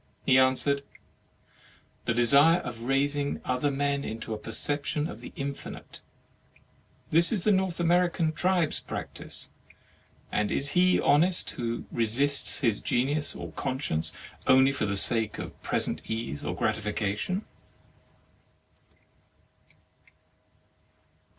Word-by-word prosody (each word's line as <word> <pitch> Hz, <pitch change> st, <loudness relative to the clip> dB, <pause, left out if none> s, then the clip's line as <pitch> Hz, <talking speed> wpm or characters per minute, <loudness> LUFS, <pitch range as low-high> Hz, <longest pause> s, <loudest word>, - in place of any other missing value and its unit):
He 130 Hz, -, +5 dB
answered: 130 Hz, +2 st, +2 dB, 1.2 s
"The 115 Hz, -, 0 dB
desire 140 Hz, +8 st, +5 dB
of 115 Hz, -7 st, -7 dB
raising 140 Hz, +2 st, 0 dB
other 130 Hz, +3 st, 0 dB
men 140 Hz, 0 st, -1 dB
into 110 Hz, 0 st, -5 dB
a -, -, -3 dB
perception 145 Hz, +7 st, -1 dB
of -, -, -8 dB
the -, -, -10 dB
infinite. 140 Hz, -2 st, -7 dB, 1.1 s
This 165 Hz, +2 st, +5 dB
the 210 Hz, -1 st, +1 dB
North 190 Hz, -3 st, +1 dB
Ameri 175 Hz, +1 st, +3 dB
can 165 Hz, -3 st, 0 dB
tribes 180 Hz, -1 st, +1 dB
practise. -, -, -7 dB, 0.8 s
And 105 Hz, -, 0 dB
is 140 Hz, +1 st, 0 dB
he 180 Hz, +4 st, +3 dB
honest 175 Hz, +5 st, +4 dB
who 115 Hz, -1 st, -4 dB
resists 130 Hz, +7 st, +1 dB
his 115 Hz, -6 st, +1 dB
genius 145 Hz, +5 st, 0 dB
or -, -, -7 dB
conscience, 130 Hz, -, -2 dB, 0.4 s
only 130 Hz, +1 st, +6 dB
for 135 Hz, -, -2 dB
the 100 Hz, -1 st, -1 dB
sake 110 Hz, +1 st, +3 dB
of -, -, -8 dB
present -, -, -1 dB
ease 110 Hz, -9 st, -4 dB
or -, -, -3 dB
gratification?" 110 Hz, -, -1 dB
140 Hz, 110 wpm, -28 LUFS, 115-155 Hz, 1.2 s, only